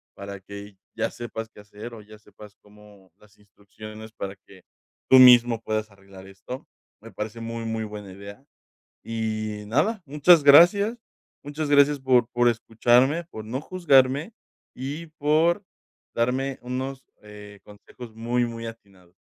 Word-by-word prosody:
para 100 Hz, 0 st, -8 dB
que 100 Hz, 0 st, -11 dB, 0.2 s
ya 115 Hz, 0 st, -2 dB
sepas 115 Hz, -2 st, -7 dB
qué -, -, -18 dB
hacer 105 Hz, +3 st, -11 dB
o 110 Hz, -, -11 dB
ya 105 Hz, +1 st, -15 dB
sepas 105 Hz, 0 st, -16 dB
cómo 105 Hz, -3 st, -20 dB
las 105 Hz, 0 st, -24 dB
instrucciones 110 Hz, +2 st, -13 dB
para 100 Hz, -2 st, -6 dB
que 95 Hz, -2 st, -17 dB, 0.5 s
tú 130 Hz, -, +8 dB
mismo 120 Hz, -2 st, +7 dB
puedas 110 Hz, 0 st, -3 dB
arreglar 95 Hz, -1 st, -15 dB
esto". 100 Hz, +7 st, -10 dB, 0.3 s
Me 115 Hz, 0 st, -13 dB
parece 105 Hz, +3 st, -6 dB
muy, 115 Hz, 0 st, -5 dB
muy 110 Hz, -1 st, -3 dB
buena 105 Hz, -2 st, -9 dB
idea. 100 Hz, +7 st, -12 dB, 0.6 s
Y 110 Hz, -2 st, -4 dB
nada, 195 Hz, -, 0 dB
muchas 150 Hz, +3 st, +4 dB
gracias. 200 Hz, +10 st, +6 dB, 0.4 s
Muchas 145 Hz, +1 st, -5 dB
gracias 145 Hz, 0 st, +4 dB
por 125 Hz, -3 st, +3 dB
por 120 Hz, 0 st, +2 dB
escucharme, 120 Hz, +7 st, +2 dB
por 110 Hz, -, -8 dB
no 125 Hz, +5 st, -4 dB
juzgarme 145 Hz, -, +2 dB, 0.4 s
y 145 Hz, +6 st, -6 dB
por 160 Hz, +4 st, +1 dB, 0.5 s
darme 130 Hz, +3 st, -1 dB
unos 130 Hz, +2 st, -5 dB, 0.6 s
consejos 110 Hz, +3 st, -13 dB
eh, -, -, -23 dB
muy, 120 Hz, +2 st, 0 dB
muy 115 Hz, -1 st, -7 dB
atinado. 100 Hz, -6 st, -14 dB
115 Hz, 145 wpm, -24 LUFS, 105-135 Hz, 0.6 s, tú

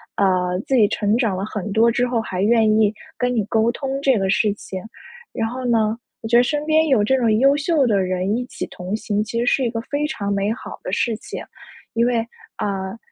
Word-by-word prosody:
呃， 180 Hz, -2 st, +1 dB
自 270 Hz, -, +1 dB
己 220 Hz, -5 st, +5 dB
成 205 Hz, +1 st, 0 dB
长 225 Hz, -7 st, 0 dB
了 190 Hz, -, -2 dB
很 210 Hz, -2 st, -5 dB
多 225 Hz, +3 st, +4 dB
之 245 Hz, +2 st, +1 dB
后， 240 Hz, -1 st, 0 dB
还 185 Hz, -4 st, -4 dB
愿 220 Hz, +1 st, +4 dB
意 215 Hz, -1 st, +3 dB, 0.2 s
跟 250 Hz, 0 st, 0 dB
你 220 Hz, -, +1 dB
沟 220 Hz, +2 st, +2 dB
通 270 Hz, +2 st, -4 dB
这 270 Hz, -4 st, +3 dB
个 195 Hz, -1 st, 0 dB
事 210 Hz, +1 st, +2 dB
情。 190 Hz, -2 st, -7 dB, 0.5 s
然 225 Hz, -, -1 dB
后 255 Hz, +2 st, -5 dB
呢， 225 Hz, -2 st, +2 dB, 0.2 s
我 225 Hz, -, -5 dB
觉 235 Hz, -, +2 dB
得 240 Hz, -, +6 dB
身 295 Hz, +4 st, -1 dB
边 315 Hz, +1 st, +3 dB
有 260 Hz, -8 st, +3 dB
这 265 Hz, +6 st, +2 dB
种 235 Hz, -3 st, +2 dB
优 275 Hz, +2 st, +5 dB
秀 290 Hz, -1 st, +2 dB
的 205 Hz, -4 st, +2 dB
人 185 Hz, +2 st, 0 dB
一 250 Hz, -, -3 dB
起 -, -, -5 dB
同 185 Hz, +3 st, -5 dB
行， 210 Hz, -1 st, -1 dB
其 225 Hz, +2 st, -3 dB
实 240 Hz, -, 0 dB
是 265 Hz, -, +2 dB
一 240 Hz, -, +1 dB
个 225 Hz, 0 st, -3 dB
非 285 Hz, +4 st, -2 dB
常 200 Hz, -9 st, -3 dB
美 200 Hz, +1 st, 0 dB
好 -, -, -9 dB
的 -, -, -4 dB
事 225 Hz, +3 st, 0 dB
情。 -, -, -7 dB, 0.5 s
因 230 Hz, +1 st, +2 dB
为 245 Hz, -1 st, +1 dB, 0.4 s
呃， 195 Hz, 0 st, -3 dB
225 Hz, 250 characters per minute, -21 LUFS, 200-250 Hz, 0.5 s, 得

